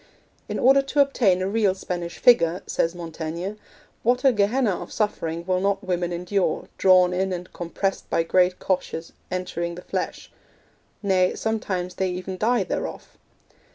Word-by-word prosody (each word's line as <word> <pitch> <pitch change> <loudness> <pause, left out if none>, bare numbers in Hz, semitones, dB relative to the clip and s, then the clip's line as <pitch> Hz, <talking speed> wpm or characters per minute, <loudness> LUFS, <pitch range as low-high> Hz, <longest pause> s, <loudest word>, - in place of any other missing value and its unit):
'In - - -2
order 270 +2 +5
to 275 +2 -2
obtain 225 -10 +3
a - - 0
real 200 -2 +2
Spanish 175 -2 -5
figure,' 175 -7 +4
says 165 +1 0
Montaigne, 170 +2 -5 0.5
'what 245 +3 +1
a 265 - +7
Gehenna 210 -1 +1
of - - -8
suffering 170 -6 -2
will 185 0 +1
not 200 0 0
women 175 -2 -1
endure, 180 +3 -1
drawn 185 -1 +5
in 190 +1 0
and 180 0 -5
compressed 185 +3 -3
by 165 - +2
great 180 +2 +3
coches 170 -3 -2 0.2
entering 175 -2 -3
the 180 - -9
flesh; - - -4 0.7
nay, 185 -2 +2
sometimes 190 -5 -2
they 190 -1 -1
even 185 +1 -5
die 235 -1 +2
thereof.' 180 - -5
185 Hz, 155 wpm, -24 LUFS, 175-205 Hz, 0.7 s, a